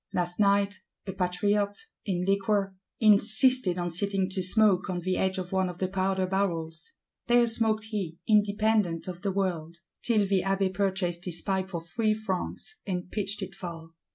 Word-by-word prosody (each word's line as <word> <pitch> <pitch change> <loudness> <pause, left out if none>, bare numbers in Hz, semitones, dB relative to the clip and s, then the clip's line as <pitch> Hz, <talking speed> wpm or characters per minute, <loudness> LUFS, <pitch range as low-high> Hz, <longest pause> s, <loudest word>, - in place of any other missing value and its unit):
Last 175 +1 -2
night, 200 -1 +2 0.3
a 190 - -5
Patriot, 200 +3 0 0.3
in 180 -3 -1
liquor, 195 0 0 0.2
insisted 215 -1 +5
on 175 -1 -2
sitting 195 +2 -1
to 190 0 -2
smoke 195 0 +3
on 180 -1 -2
the 185 +1 -1
edge 190 0 0
of 180 -1 -5
one 190 -1 +1
of 175 - -8
the 185 - -1
Powder 190 0 0
barrels; 165 -4 -3 0.3
there 240 0 +5
smoked 225 -1 +2
he, 200 -7 -5
independent 210 -5 +2
of 180 -1 -7
the 200 -1 -1
world,—till 185 +3 -2
the 195 -1 +1
Abbé 195 0 0
"purchased 190 -3 -1
his 170 -2 -3
pipe 190 -1 -1
for 170 -3 -4
three 215 +5 0
francs," 215 - -5
and 180 -1 -4
pitched 205 -1 -2
it 190 0 -7
far. 170 -4 -8
190 Hz, 165 wpm, -27 LUFS, 180-205 Hz, 0.3 s, insisted